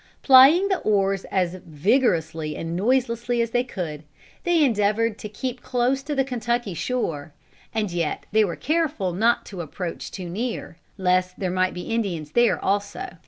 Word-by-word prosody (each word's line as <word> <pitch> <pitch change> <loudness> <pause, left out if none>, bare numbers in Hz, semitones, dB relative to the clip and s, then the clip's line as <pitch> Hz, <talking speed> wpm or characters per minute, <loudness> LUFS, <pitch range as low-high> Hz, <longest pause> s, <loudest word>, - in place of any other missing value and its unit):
Plying 275 +8 +7
the 385 -2 0
oars 195 -2 +1
as 185 -1 -1
vigorously 160 - 0
and 165 +1 -4
noiselessly 240 +3 +1
as 230 -1 0
they 245 +1 +2
could, 170 - -5 0.4
they 345 -3 +4
endeavored 215 -2 +1
to 210 - -6
keep 245 +4 -5
close 250 +2 0
to 290 +1 -4
the 270 - +3
Kentucky 240 -4 -2
shore. 165 - -3 0.4
And 215 -4 -1
yet 170 -3 -2
they 215 +1 +4
were 185 -5 -2
careful 300 - -1
not 225 +6 +2
to 190 -4 -7
approach 170 +2 -6
too 185 -2 -7
near, 210 -2 -4 0.2
lest 185 -1 +1
there 185 -2 -1
might 185 0 0
be 180 - -5
Indians 175 -10 -2
there 240 +3 +3
also. 205 - -1
210 Hz, 165 wpm, -24 LUFS, 180-245 Hz, 0.4 s, Plying